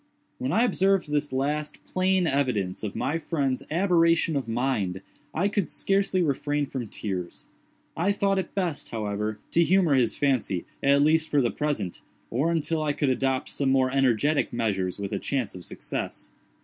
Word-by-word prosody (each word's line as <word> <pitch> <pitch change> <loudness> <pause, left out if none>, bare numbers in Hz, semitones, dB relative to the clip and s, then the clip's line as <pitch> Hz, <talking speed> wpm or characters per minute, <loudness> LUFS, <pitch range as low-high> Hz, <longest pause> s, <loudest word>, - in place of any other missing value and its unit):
When 130 - -1
I 225 +8 +3
observed 195 -8 +2
this 145 0 0
last, 150 +3 -2
plain 185 0 +1
evidence 125 - 0
of 105 -3 -4
my 160 +3 -1
friend's 140 -5 -1
aberration 165 -2 +3
of 135 -4 -1
mind, 115 -6 -1 0.3
I 175 +7 +1
could 200 -3 -1
scarcely 195 -2 +1
refrain 145 0 0
from 130 -4 -5
tears. 95 -4 -5 0.5
I 180 +5 +1
thought 200 -1 +1
it 190 - -5
best, 175 -6 -2
however, 105 -1 -2
to 170 - +4
humor 180 -3 +3
his 125 -4 +2
fancy, 125 -10 0 0.2
at 140 +1 +4
least 160 +1 +3
for 145 - +3
the 120 -3 +2
present, 140 - -2 0.3
or 135 +8 +1
until 165 -1 0
I 150 -1 0
could 145 -1 0
adopt 130 0 0
some 140 -2 0
more 130 -1 +3
energetic 135 +2 +2
measures 95 -6 -1
with 100 -1 -4
a - - -1
chance 130 -6 -2
of 90 - -9
success. - - -5
140 Hz, 170 wpm, -26 LUFS, 120-165 Hz, 0.5 s, to